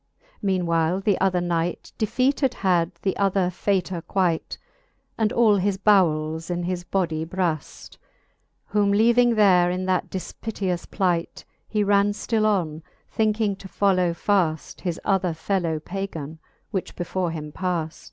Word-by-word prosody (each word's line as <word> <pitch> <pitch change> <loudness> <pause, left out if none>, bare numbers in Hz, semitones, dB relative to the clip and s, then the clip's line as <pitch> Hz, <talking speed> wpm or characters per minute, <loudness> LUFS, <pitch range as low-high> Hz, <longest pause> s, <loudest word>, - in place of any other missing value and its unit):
Meane 190 -4 0
while 165 +2 +1
the 195 0 0
other 185 -2 +2
knight 175 0 -2
Defeated 255 +5 +1
had 180 -3 +1
the 190 - 0
other 195 -2 +1
faytour 185 -2 -1
quight. 175 -1 -1 0.6
And 220 -1 +1
all 220 -3 +4
his 195 0 0
bowels 165 -5 +2
in 175 0 -2
his 180 0 -3
body 170 -4 -1
braft: 165 -3 -4 0.7
Whom 205 -1 +1
leaving 235 +3 +4
there 185 -4 +5
in 185 +1 -2
that 185 -1 0
difpiteous 190 -1 -4
plight, 175 -4 -1 0.2
He 210 -1 0
ran 200 0 +3
ftill 215 +1 0
on, 170 -7 0 0.3
thinking 215 -2 +1
to 195 - -10
follow 185 -3 +2
faft 170 -3 0
His 175 -3 -3
othsr 185 -4 +1
fellow 165 -2 -1
Pagan, 165 -4 -6 0.3
which 190 -4 -3
before 180 0 -2
him 155 -2 -6
paft. 170 -2 -3
185 Hz, 140 wpm, -24 LUFS, 170-200 Hz, 0.7 s, there